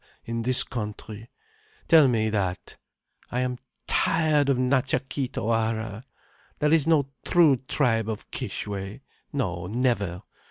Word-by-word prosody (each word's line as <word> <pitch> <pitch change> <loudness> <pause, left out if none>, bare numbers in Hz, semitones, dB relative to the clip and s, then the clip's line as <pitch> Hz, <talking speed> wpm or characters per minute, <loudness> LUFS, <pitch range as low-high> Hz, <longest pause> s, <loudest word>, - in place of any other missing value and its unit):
—in 115 0 -3
this 125 +2 +4
country?—tell 155 - -1
me 110 -3 +1
that. 95 -4 -2 0.5
I 125 - -1
am 125 -1 -2 0.3
tired 155 -3 +2
of 135 - +3
Natcha 130 0 +1
Kee 135 -1 -2
Tawara. 110 -1 -2 0.5
There 150 +1 +2
is 160 -2 +3
no 145 -4 +3
true 165 -6 +5
tribe 115 -6 +1
of 110 -1 -6
Kishwe—no, 100 -2 -5
never. 105 -6 -1
125 Hz, 115 wpm, -26 LUFS, 110-140 Hz, 0.5 s, true